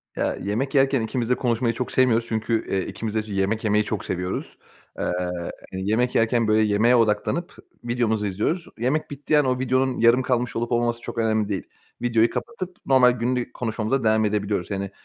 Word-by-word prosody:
Ya, - - -1
yemek 130 +8 -2
yerken 135 -2 +3
ikimiz 120 +1 -2
de 125 - +4
konuşmayı 120 -1 0
çok 125 +2 -4
sevmiyoruz 120 -3 +3
çünkü, 110 0 -1
eee, 95 -1 -1
ikimiz 110 -1 -5
de - - +2
yemek 100 +3 0
yemeyi 105 0 +2
çok 105 -1 -4
seviyoruz. 90 0 -4 0.4
Eee, - - -1 0.7
yemek 110 +6 0
yerken, 115 0 +2
böyle, 110 0 +4
yemeğe 110 +4 +3
odaklanıp 115 +10 0 0.3
videomuzu 115 -3 0
izliyoruz. 110 - -1
Yemek 130 +7 0
bittiği 145 +2 +1
an 145 - +2
o 125 0 0
videonun 130 0 +1
yarım 115 +2 +5
kalmış 125 -2 -1
olup 120 +1 -2
olmaması 120 0 0
çok 120 - -7
önemli 110 -2 +1
değil. 95 - -2 0.4
Videoyu 115 -1 +3
kapatıp 185 - -5
normal 130 -2 +5
günlük 125 +1 -2
konuşmamıza 115 +2 -1
devam 110 0 +3
edebiliyoruz. 100 -3 -1
Yani, 100 0 -3
115 Hz, 175 wpm, -24 LUFS, 110-125 Hz, 0.7 s, yarım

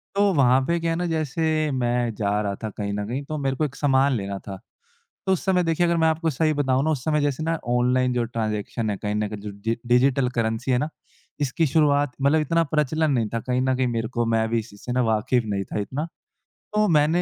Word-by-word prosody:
तो 200 0 +4
वहाँ 130 -4 +4
पे 170 +3 +1
क्या 165 0 -1
है 165 - -1
ना, 175 - -1
जैसे 155 -1 0
मैं 120 -2 0
जा 105 -1 0
रहा 100 -1 -2
था 110 - -2
कहीं 100 0 -4
न 105 0 -2
कहीं 130 +5 -3
तो 155 +2 -4
मेरे 135 -2 -1
को 155 - 0
एक 140 -2 -6
सामान 135 -1 +3
लेना 100 -1 -4
था। 95 -1 -8 0.7
तो 190 - +4
उस 185 - -2
समय 180 -2 +3
देखिए 165 +1 +1
अगर 170 0 +1
मैं 160 -1 +3
आपको 160 +1 +1
सही 155 +2 +1
बताऊँ 135 -2 +1
ना 160 - +1
उस 135 -5 -2
समय 150 -1 +1
जैसे 145 +1 -1
ना 165 +1 0 0.2
ऑनलाइन 125 +1 +2
जो 120 -1 +1
ट्रांजेक्शन 110 -1 -2
है 100 - -2
कहीं 105 +2 -3
न 105 0 0
कहीं 105 -1 -7
जो 105 0 -6
डि 115 0 0
डिजिटल 125 +1 +3
करेंसी 115 +3 0
है 125 - +3
ना, 150 +5 -1 0.5
इसकी 145 +3 +1
शुरुआत 145 -1 +3
मतलब 145 +3 +3
इतना 165 +3 +2
प्रचलन 155 +1 +1
नहीं 115 -5 +1
था 115 - 0
कहीं 125 0 +2
न 130 0 +1
कहीं 130 -1 +1
मेरे 115 -1 -1
को 120 -2 -1
मैं 110 0 +2
भी 115 0 +1
इसी 105 -2 -9
से 125 - -7
वाकिफ़ 115 +1 +1
नहीं 100 -2 -2
था - - -4
इतना। 135 +10 -3 0.7
तो 210 0 +3
मैंने 160 0 +3
130 Hz, 245 wpm, -24 LUFS, 115-155 Hz, 0.7 s, तो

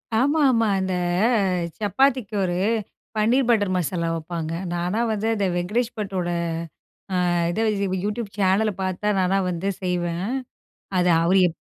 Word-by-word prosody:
ஆமாம்மா. 260 -3 +3
இந்த 190 0 -1 0.4
அ - - +2 0.4
சப்பாத்திக்கு 230 +1 +1
ஒரு 175 -1 -1 0.6
பன்னீர் 240 +4 +3
பட்டர் 205 -5 +3
மசாலா 170 -1 -1
வப்பாங்க. 165 0 -4 0.2
நானா 175 +5 -1
வந்து 215 +1 -1
அந்த 200 - 0
வெங்கடேஷ் 220 +7 -1
பட்டோட, 190 -4 -2 0.9
ஆ - - +1 0.4
இத 220 +4 0 0.4
யூடியூப் 210 -1 -4
சேனல 200 +3 +3
பார்த்தா 190 +3 0
நான்லாம் 185 0 +1
வந்து 180 +3 -2
செய்வேன். 175 -1 -1 0.7
அத 180 - +3 0.2
அவரு 185 +3 +4
எப் 160 - -10
195 Hz, 130 wpm, -23 LUFS, 180-220 Hz, 0.9 s, அவரு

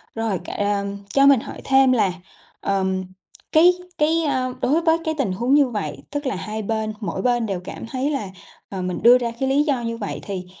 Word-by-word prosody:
Rồi, 225 -5 -1
c - - -11
ờm, 200 -1 -1 0.2
cho 275 0 +5
mình 275 -4 +6
hỏi - - -9
thêm 265 -1 +4
là, 200 -7 +2 0.5
ờm, 190 -1 0 0.5
cái 345 +3 +6 0.2
cái, 320 +2 +2
ơ, 255 -3 0
đối 305 +6 +2
với 325 0 +4
cái 315 - 0
tình 245 -9 0
huống 240 +7 0
như 285 -3 +5
vậy, 215 -4 -4
tức 290 0 -3
là 260 - -1
hai 215 +3 -4
bên 220 0 -2
mỗi 210 - -3
bên 240 -2 +1
đều 195 -4 -2
cảm - - -7
thấy 265 +4 -2
là, 240 -9 -2 0.4
ờ, 190 -2 -5
mình 180 -1 -3
đưa 245 +2 +8
ra 235 -2 -2
cái 265 0 0
lý 285 +2 +3
do 275 -5 0
như 230 0 -3
vậy, - - -4
thì 185 -3 -5
240 Hz, 220 wpm, -22 LUFS, 200-275 Hz, 0.5 s, đưa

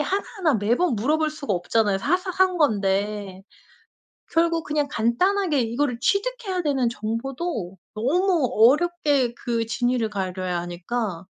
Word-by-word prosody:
하나하나 375 - 0
매번 235 - +1
물어볼 305 +7 +1
수가 285 -8 -4
없잖아요. 200 +2 +1
사소한 365 - +1
건데. 200 -5 0 0.9
결국 330 0 +2
그냥 295 -1 -1
간단하게 300 - +1
이거를 240 +2 -1
취득해야 400 - 0
되는 270 -5 +1
정보도 230 - -4 0.2
너무 320 - +1 0.2
어렵게 295 -7 0
그 230 -2 -2
진위를 240 -1 0
가려야 185 -3 -3
하니까 180 +1 -4
250 Hz, 290 characters per minute, -24 LUFS, 210-335 Hz, 0.9 s, 결국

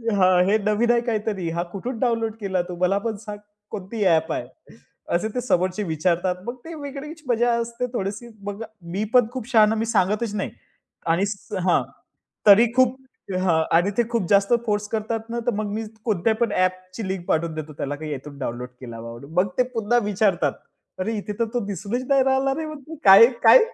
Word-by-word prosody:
हां, 185 -2 +5
"हे 210 +3 +3
नवीन 215 +3 +2
आहे 235 -1 +3
काहीतरी, 210 -6 -2
हा 170 +1 -1
कुठून 235 +4 -4
डाउनलोड 230 -3 0
केला 190 -2 0
तू? 180 - -4
मला 185 +2 +3
पण 220 +1 -3
सांग. 210 -1 -6 0.3
कोणती 205 +2 -4
ॲप 160 -2 +3
आहे?" - - -4 0.7
असे 215 +5 +1
ते 250 - 0
समोरचे 185 -3 0
विचारतात, 175 +2 0
मग 240 +1 -4
ते 335 - -7
वेगळीच 295 +2 -7
मजा 240 0 +2
असते 235 +1 -3
थोडीशी. 205 +2 -3 0.2
मग 205 +2 -5 0.3
मी 200 +4 -1
पण 245 -3 +6
खूप 255 -3 -6
शहाणा, 220 -1 +5
मी 225 +1 -1
सांगतच 210 +1 +1
नाही 200 - -2 0.6
आणि 170 +4 +2 0.4
हां, 175 - +4 0.7
तरी 210 +4 +9
खूप 255 0 +4 0.4
हां. 170 -4 +2 0.2
आणि 190 +4 +2
ते 240 - +4
खूप 230 -7 -1
जास्त 200 +2 +4
फोर्स 210 -1 0
करतात 225 +1 -3
ना, 235 - -2
तर 245 - +4
मग 210 -1 -2
मी 220 - -2 0.2
कोणत्या 215 +1 +1
पण 230 -2 0
ॲपची 185 +2 -1
लिंक 190 -2 -4
पाठवून 160 0 0
देतो, 155 -1 -6
त्याला 145 0 -4
का 155 +2 -8
यातून 145 -1 -6
डाउनलोड 125 -1 -4
केला 115 -2 -8
बाबांनो. 115 +4 -9
मग 195 - -2
ते 250 - +5
पुन्हा 230 +2 +2
विचारतात, 190 -8 +1 0.5
"अरे! 220 +5 -1
इथे 210 0 -4
तर 230 - +3
तो 245 - +1
दिसूनच 205 +5 -3
नाही 275 -1 +5
राहिला 265 0 +2
रे, 320 - -3
मग 305 +2 -10
काय-काय?" 230 - +8
210 Hz, 190 wpm, -23 LUFS, 185-235 Hz, 0.7 s, तरी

